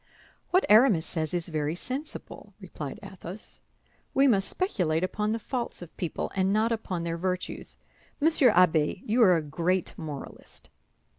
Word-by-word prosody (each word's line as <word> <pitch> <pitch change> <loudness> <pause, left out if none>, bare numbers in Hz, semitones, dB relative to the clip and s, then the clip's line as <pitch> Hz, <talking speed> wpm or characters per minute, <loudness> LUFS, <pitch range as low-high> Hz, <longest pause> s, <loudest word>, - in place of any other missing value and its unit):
"What 370 +2 +3
Aramis 210 -6 +6
says 155 -3 -2
is 175 -1 -2
very 155 0 -1
sensible," 265 - -5
replied - - -7
Athos; 195 0 -6 0.6
"we 270 +1 +5
must 200 -7 +3
speculate 180 - 0
upon 210 +3 -1
the 225 - 0
faults 240 -4 -4
of 170 - -14
people, 175 - -3
and 190 0 +2
not 220 +3 +2
upon 190 -6 -2
their 170 0 -2
virtues. 185 0 -3 0.4
Monsieur 305 -4 +5
Abbé, 170 -1 +3
you 230 +3 +2
are 185 -6 +6
a 160 - -2
great 170 +5 -1
moralist." 150 -4 -9
185 Hz, 150 wpm, -28 LUFS, 165-225 Hz, 0.6 s, Aramis